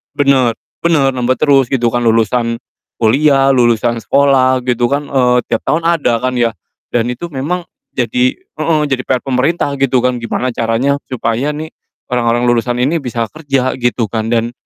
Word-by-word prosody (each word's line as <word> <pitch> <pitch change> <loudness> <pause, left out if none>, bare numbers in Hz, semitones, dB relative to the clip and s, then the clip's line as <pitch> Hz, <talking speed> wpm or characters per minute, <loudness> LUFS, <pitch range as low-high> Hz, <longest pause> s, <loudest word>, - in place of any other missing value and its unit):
bener 135 -5 +2 0.3
bener 145 -5 +3
nambah 125 +1 +1
terus 135 -4 +3
gitu 120 -3 +2
kan 120 - +1
lulusan 115 +1 +1 0.5
kuliah, 135 +3 +4
lulusan 120 -2 +2
sekolah 130 -2 +3
gitu 120 -1 +1
kan, 145 +2 -2
eee, 125 -2 +3
tiap 115 - +1
tahun 165 +2 +1
ada 140 -9 +1
kan 130 0 0
ya. 115 -1 +2 0.4
Dan 120 0 +1
itu 170 +8 -6
memang 170 +7 -3 0.3
jadi 125 0 +1
heeh, 155 0 -2
jadi 130 -2 0
PR 130 -1 +1
pemerintah 140 +3 0
gitu 135 -2 +2
kan 125 -1 +1
gimana 125 +2 -2
caranya 115 +5 +1 0.2
supaya 125 +4 -1
nih 155 +1 -5 0.4
orang-orang 120 0 +1
lulusan 120 +1 0
ini 145 +6 +1
bisa 115 -2 -2
kerja 135 -5 -1
gitu 120 -2 0
kan 110 +1 -2
dan 115 0 0
125 Hz, 165 wpm, -15 LUFS, 120-140 Hz, 0.5 s, kuliah